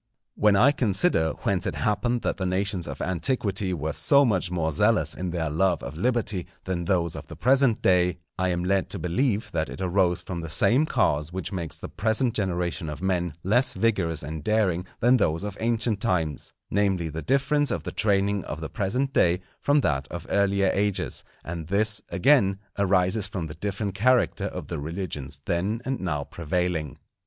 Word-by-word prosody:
When 105 -1 +3
I 125 +8 +6
consider 105 - +1
whence - - 0
it - - -2
happened 120 +4 0
that - - -1
the 95 - -2
nations 95 -1 0
of 70 -1 -5
antiquity 95 - 0
were 80 -2 -2
so 140 0 +4
much 100 -8 +1
more 85 -3 -1
zealous 70 - +2
in 90 0 -4
their 80 -3 -2
love 90 +2 +1
of 70 - -6
liberty 105 -2 0 0.2
than 90 -2 -3
those 85 -2 +1
of - - -8
the - - -9
present 130 -1 +2
day, 90 -1 +3 0.2
I 95 0 +1
am 90 -1 -1
led 95 +1 +1
to - - -1
believe 105 +3 -1
that 80 -4 -1
it 65 - -8
arose 90 -1 +2
from 85 -2 -5
the 80 - -6
same 130 - +3
cause 75 - +1
which 95 +3 -4
makes 85 -5 -4
the - - -7
present 110 +3 0
generation 90 -4 -2
of 75 +4 -7
men 90 -4 0
less 125 +7 +2
vigorous 95 -9 0
and 75 +1 -6
daring 95 -4 +1
than 125 +2 +5
those 80 -5 0
of 105 -2 -4
ancient 115 -2 0
times, 80 - -1 0.2
namely 95 -4 +1
the 80 +1 -5
difference 140 - +1
of - - -2
the - - -5
training 100 -2 +1
of 75 - -5
the 80 - -5
present 125 +8 -1
day 90 -4 +3 0.2
from 145 0 +3
that 70 - 0
of 85 +1 -7
earlier 100 -1 +2
ages; 100 -1 -1 0.2
and 80 -2 -6
this, 105 +3 +1
again, 100 -2 +3 0.2
arises 95 +1 +2
from 95 -4 -4
the 75 - -7
different 100 +3 -3
character 125 +6 +2
of - - -5
the - - -5
religions 80 -3 -5
then 95 +6 -1
and 135 0 -2
now 75 -6 -2
prevailing. 85 -2 -2
95 Hz, 185 wpm, -26 LUFS, 85-110 Hz, 0.2 s, I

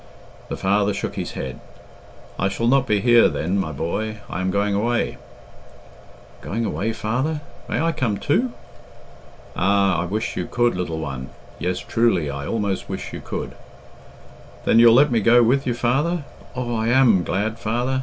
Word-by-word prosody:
The - - -4
father 100 +1 +1
shook - - -3
his - - -5
head. 65 -2 -5 0.8
"I 95 - +2
shall 105 +4 -2
not 135 +1 +3
be 105 -3 +2
here 120 0 +6
then, 90 +5 -1
my 80 -5 -2
boy. 105 +9 -3
I 90 - -3
am 95 - 0
going 100 +2 0
away 115 +4 0 0.6
" - - -22
"Going 115 +2 -2
away, 110 +2 -1
father? 130 +8 -2 0.3
May - - 0
I 165 +2 +2
come 115 -10 -1
too?" 180 - +1 1.0
"Ah! 95 -2 +2
I - - -2
wish 105 +5 -3
you - - -3
could, 120 -2 +1
little 90 -3 -3
one. 70 -5 -5 0.3
Yes, 90 +1 -1
truly 95 -11 +1
I 70 0 -5
almost 100 -4 -2
wish - - -5
you - - -6
could." - - -5 1.1
"Then 115 - +5
you'll 115 0 +8
let 140 +2 +5
me 115 - +3
go 120 +3 +5
with 135 +4 +2
you, 120 - 0
father! 145 +8 0 0.3
Oh, 125 -1 -2
I 110 0 -1
am 120 -7 +4
glad, 110 +5 -2
father." 120 +4 -1
110 Hz, 175 wpm, -22 LUFS, 95-120 Hz, 1.1 s, you'll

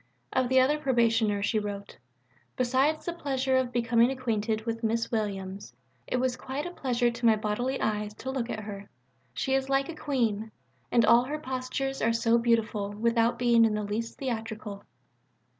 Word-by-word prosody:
Of 255 -1 +1
the 260 0 +5
other 290 +4 +3
Probationer, 225 -6 +2
she 215 +1 +1
wrote: 200 -1 -6 0.6
"Besides 265 +5 +1
the 345 - -2
pleasure 270 -5 0
of 260 -1 +1
becoming 235 0 +3
acquainted 225 -4 -1
with 230 0 -3
Miss 230 +1 0
Williams 195 - -3 0.3
it - - 0
was 255 0 0
quite 265 +4 -5
a 350 - -4
pleasure 245 -7 0
to 235 +1 -4
my 220 - +6
bodily 215 +5 -2
eyes 210 0 -1
to 265 - -5
look 250 -3 -3
at 215 - -3
her. 200 -1 -8 0.5
She 265 - -1
is 270 0 +1
like 275 +1 +1
a 335 - -5
queen; 225 -8 -1 0.4
and 235 -2 +4
all 235 +2 +6
her 295 +4 -3
postures 270 -1 -3
are 230 +1 +2
so 230 0 +3
beautiful, 225 -3 +1
without 230 +2 +2
being 235 -2 +4
in 220 -2 +3
the 210 - -2
least 215 +3 -3
theatrical." 220 -5 -5
235 Hz, 175 wpm, -28 LUFS, 215-260 Hz, 0.6 s, my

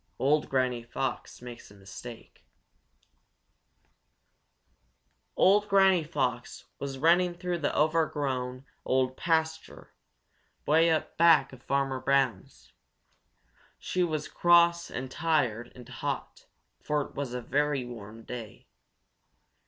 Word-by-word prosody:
Old 150 +3 +1
Granny 130 -2 0
Fox 120 +1 -5
Makes 120 -1 -10
a 105 - -16
Mistake 105 +4 -11 2.9
Old 205 +2 +4
Granny 190 -3 +4
Fox 125 -6 -3 0.2
was 140 -1 -5
running 175 +4 +3
through 175 0 -3
the 145 - -1
overgrown 140 -5 0 0.2
old 130 0 0
pasture, 160 - -2 0.7
way 160 +3 +4
up 160 -1 -1
back 160 -5 +5
of 130 - -13
Farmer 135 -1 -1
Brown's. 130 - -1 1.0
She 185 - -2
was 155 -3 -2
cross 170 +2 +3
and 130 +1 -6
tired 130 -9 0
and 125 -2 -12
hot, 135 +2 -5 0.3
for 150 -1 -1
it - - -13
was 135 -3 -4
a - - -2
very 145 0 0
warm 115 -2 -10
day. 115 -3 -9
140 Hz, 110 wpm, -28 LUFS, 125-160 Hz, 2.9 s, back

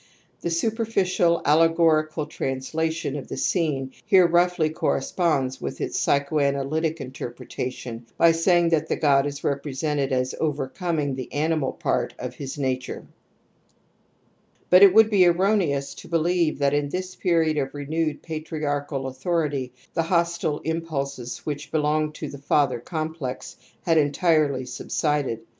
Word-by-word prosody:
'^Thc 170 - -1
Superficial 190 -4 +1
allegorical 155 0 +3
translation 145 +4 -3
of 140 - -6
the - - -6
scene 145 -7 0
here 185 -2 +5
roughly 175 -2 +2
corres 135 -3 -1
ponds 140 -8 +1
with - - -5
its - - -2
psychoanalytic 145 +2 0
interpretation 125 -2 -6
by 170 - +6
saying 170 +1 +3
that 160 -1 +1
th^od 140 -2 +3
is 145 0 -6
represented 140 0 -1
^ 130 0 0
overcoming 150 0 -1
^ - - -3
the 130 -1 -7
animal 155 -2 0
part - - -2
of 125 0 -5
his 135 +2 -7
nature 130 -2 -3 1.6
^^^iD - - -39
But 180 +1 +8
it 200 -1 +9
would 220 +2 +6
be 190 -3 +5
erroneous 170 -6 +1
to - - -12
believe 170 0 +1
that 140 0 +1
in 145 -1 0
this 185 +3 -4
period 160 -4 +1
of 135 0 -3
renewed 155 +2 -2
patriarchal 150 -3 -3
authority 140 -1 -2 0.2
the - - +1
hostile 170 -2 0
impulses 140 -6 -4
which 150 0 -5
belong 155 0 +1
to 155 - -6
the 140 -1 -9
father 140 -2 +1
complex 155 -1 -5 0.3
had 165 -2 +3
entirely 145 -3 +2
subsided. 130 0 -2
155 Hz, 135 wpm, -24 LUFS, 140-165 Hz, 1.6 s, it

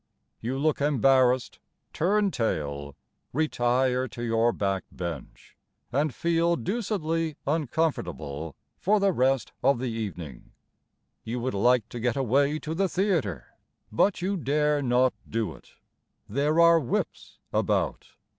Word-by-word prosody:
You 125 +4 -3
look 150 +1 +1
embarrassed, 130 -3 +3 0.3
turn 200 +4 +2
tail, 70 - -2 0.4
retire 130 -3 +1
to 120 0 -7
your 115 0 +2
back 100 -3 -1
bench, 85 -3 -7 0.4
And 145 +3 +1
feel 170 +6 +1
deucedly 165 -7 -2
uncomfortable 90 - -2 0.2
for 210 +3 +3
the 200 0 +3
rest 135 -4 +1
of 140 - +3
the 125 0 -3
evening. 90 - -6 0.7
You 120 +2 -3
would 130 +2 -2
like 115 +2 +3
to 120 - -6
get 120 0 0
away 140 +3 +2
to 155 +1 -5
the 190 +3 +1
theatre, 165 - -1 0.4
But 180 - +2
you 195 +1 0
dare 150 -1 +1
not 125 0 +3 0.2
do 110 -7 -1
it: - - -18 0.5
There 145 +8 +1
are 170 0 +7
Whips 125 -6 -3 0.2
about. - - 0
130 Hz, 125 wpm, -27 LUFS, 115-160 Hz, 0.7 s, are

